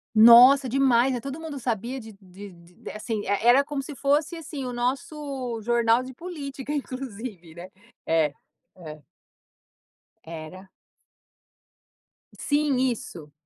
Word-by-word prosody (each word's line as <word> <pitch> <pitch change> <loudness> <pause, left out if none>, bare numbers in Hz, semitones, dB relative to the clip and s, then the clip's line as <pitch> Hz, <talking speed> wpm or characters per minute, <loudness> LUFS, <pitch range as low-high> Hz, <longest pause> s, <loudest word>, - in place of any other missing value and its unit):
Nossa, 245 +5 +8
demais, 260 0 +3
né, 245 - -2
e - - -14
todo 275 +2 -6
mundo 310 -4 -7
sabia 240 +2 -3
de 220 -2 -11
de 195 +1 -12
de 170 +1 -13
assim 215 0 -4
é. 205 +3 -1
Era 260 +3 +6
como 280 -1 -5
se 290 0 -9
fosse 295 +5 0
assim 295 -4 -7
o 250 - -5
nosso 260 -1 -3
jornal 235 +1 +2
de 260 +1 -9
política, 285 -3 -7
inclusive, 240 - -6
né? 175 +2 -10 0.4
É, 160 -3 +1 0.4
é. 155 -4 -10 1.2
Era. 165 +4 -10 1.7
Sim, 290 -2 0
isso. 220 - -3
245 Hz, 130 wpm, -25 LUFS, 205-275 Hz, 1.7 s, Nossa